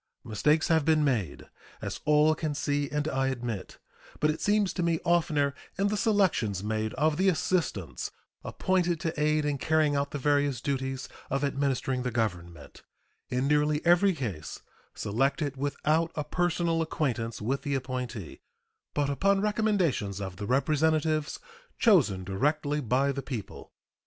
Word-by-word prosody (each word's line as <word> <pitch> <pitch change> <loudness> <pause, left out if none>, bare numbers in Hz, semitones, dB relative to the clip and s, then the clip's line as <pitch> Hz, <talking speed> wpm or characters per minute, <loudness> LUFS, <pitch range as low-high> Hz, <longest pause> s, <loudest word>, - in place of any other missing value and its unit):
Mistakes 150 +9 +2
have 160 -2 +4
been 155 0 +3
made, 120 - -1 0.3
as - - -5
all 150 +1 +5
can 155 -2 -3
see 145 0 -1
and 150 +1 -1
I 135 -2 0
admit, 120 -6 -4 0.4
but 150 - +3
it 155 - -6
seems 205 -2 +2
to 180 - -2
me 170 -1 +1
oftener 155 -5 +2 0.2
in 200 +1 +2
the 210 - 0
selections 185 - +1
made 110 0 -2
of 150 +2 +1
the 190 +2 +4
assistants 160 - -1 0.3
appointed 180 -3 0
to 160 -2 -2
aid 150 0 +2
in 145 -2 -1
carrying 155 -1 +2
out 140 0 0
the 145 - -4
various 145 -2 +1
duties 135 0 -3 0.2
of 135 +1 -1
administering 135 -2 0
the 125 - -1
Government 90 -10 -4 0.5
in 125 +2 0
nearly 150 +1 +2
every 175 +3 +5
case 100 - -5 0.3
selected 135 +6 0
without 155 +4 0
a 150 - -1
personal 170 +1 0
acquaintance 125 -8 -2
with 130 +6 -1
the 140 -1 -2
appointee, 125 - -5 0.5
but 145 -1 +1
upon 195 +8 +2
recommendations 195 - 0
of 95 -2 -6
the 100 - -5
representatives 155 +3 +1 0.4
chosen 135 - +4
directly 145 - 0
by 135 +3 +1
the 140 0 -4
people. 125 -6 -7
145 Hz, 150 wpm, -28 LUFS, 125-160 Hz, 0.5 s, all